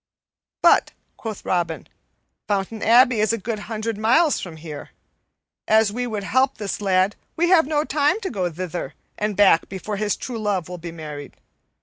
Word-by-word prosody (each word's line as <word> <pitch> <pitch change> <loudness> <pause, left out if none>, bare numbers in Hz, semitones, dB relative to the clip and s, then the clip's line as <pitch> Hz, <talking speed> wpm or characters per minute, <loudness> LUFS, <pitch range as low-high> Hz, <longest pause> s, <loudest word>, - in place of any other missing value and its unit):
"But," - - +5 0.2
quoth 220 -3 -7
Robin, 170 -3 -1 0.6
"Fountain 205 +1 -2
Abbey 240 0 +5
is 215 +1 +2
a - - 0
good 220 +1 -4
hundred 220 -1 -3
miles 275 +9 +3
from 170 -4 -8
here. 155 -2 -8 0.8
An 220 +1 +5
we 245 +2 -2
would 215 -3 -4
help 260 +6 +1
this 205 0 -4
lad, 190 0 +2 0.2
we 345 +1 +1
have 330 -6 +5
no 300 -1 +1
time 295 +6 +1
to 385 - -4
go 185 -6 -1
thither 175 +1 -5 0.2
and 210 -1 -2
back 195 -5 +5
before 200 +2 -5
his 210 0 0
true 240 -3 -6
love 200 -5 -1
will 180 0 -7
be 170 0 -7
married. 150 -3 -8
210 Hz, 175 wpm, -22 LUFS, 185-235 Hz, 0.8 s, But